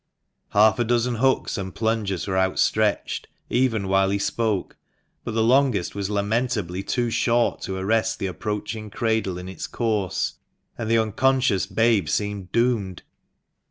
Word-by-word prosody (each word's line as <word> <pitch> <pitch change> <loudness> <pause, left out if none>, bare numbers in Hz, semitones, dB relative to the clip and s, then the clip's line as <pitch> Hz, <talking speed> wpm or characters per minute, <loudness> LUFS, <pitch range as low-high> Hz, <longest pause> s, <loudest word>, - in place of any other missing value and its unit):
Half 110 +2 +5
a - - +3
dozen 120 +1 +1
hooks 130 -2 +1
and 95 -1 -6
plungers 110 -4 -1
were 95 - -2
outstretched, 95 +3 +1 0.2
even 120 -5 +1
while 95 0 +3
he 100 - +1
spoke; 105 -1 -1 0.5
but - - -4
the 110 - +3
longest 125 -5 +2
was 100 -1 -3
lamentably 105 -3 -1
too 120 +4 -1
short 120 +1 +1
to 95 - -4
arrest 110 +4 +1
the - - -3
approaching 105 +4 -4
cradle 110 -4 -1
in 90 0 -7
its 95 - -6
course, 110 -6 -1 0.4
and 110 - -4
the 115 - +4
unconscious 115 -1 +2
babe 105 -4 +2
seemed 100 -2 -2
doomed. 115 -6 0
110 Hz, 145 wpm, -24 LUFS, 95-115 Hz, 0.5 s, Half